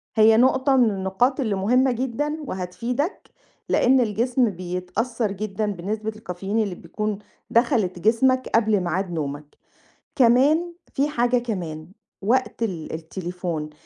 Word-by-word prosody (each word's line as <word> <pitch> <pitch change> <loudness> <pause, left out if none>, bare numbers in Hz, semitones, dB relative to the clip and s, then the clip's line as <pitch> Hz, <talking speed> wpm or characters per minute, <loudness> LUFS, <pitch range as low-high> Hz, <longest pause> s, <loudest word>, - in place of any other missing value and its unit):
هي 220 0 +6
نقطة 260 +2 +4
من 245 -3 +5
النقاط 195 +8 0
اللي 220 -7 0
مهمة 250 +7 +3
جدًا، 265 +5 -2
وهتفيدك، 235 - -3 0.4
لإن 260 +1 +4
الجسم 235 +2 +1
بيتأثّر 185 +5 -3
جدًا 210 +1 -3
بنسبة 210 +4 -3
الكافيين 205 -1 -4
اللي 200 -5 -1
بتكون 210 +5 -4 0.3
دخلت 225 -7 +2
جسمك 255 +6 +2
قبل 220 -2 +3
ميعاد 180 +1 -2
نومك. 150 -2 -5 0.6
كمان، 280 +8 +4 0.2
فيه 280 +2 +1
حاجة 245 -3 +2
كمان، 175 -10 -5 0.3
وقت 245 +3 0
ال– 180 -8 -3
التليفون. 170 -1 -5
215 Hz, 120 wpm, -23 LUFS, 180-250 Hz, 0.6 s, هي